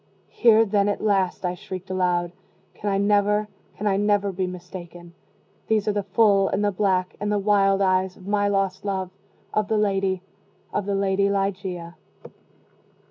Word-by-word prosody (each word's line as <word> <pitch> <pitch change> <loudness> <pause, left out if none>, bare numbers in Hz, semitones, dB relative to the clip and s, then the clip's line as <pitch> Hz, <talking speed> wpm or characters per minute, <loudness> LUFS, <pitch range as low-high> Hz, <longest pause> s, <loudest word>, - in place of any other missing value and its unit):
"Here 225 -1 +5
then, 200 -1 +1
at 205 - -1
least," 195 -3 +1
I 180 - 0
shrieked 185 -1 -8
aloud, 180 -2 0 0.4
"can 205 - -4
I 195 - +1
never 205 +1 +2 0.3
can 210 - -5
I 195 -2 +2
never 205 -1 +1
be 185 0 -2
mistaken 175 -1 -9 0.5
these 215 -1 +1
are - - +3
the 205 0 -1
full, 200 -2 +3
and 205 +2 0
the 205 - +2
black, 185 -2 0
and 205 0 -2
the 210 - +2
wild 195 -1 +3
eyes 185 0 +1
of 185 - -15
my 205 0 +1
lost 195 -1 0
love 190 -2 -3 0.4
of 215 -1 +1
the 220 - +1
Lady 195 -3 0 0.5
of 200 - -2
the 200 - 0
LADY 195 0 +1
LIGEIA." 190 -3 -3
195 Hz, 170 wpm, -24 LUFS, 185-205 Hz, 0.5 s, Here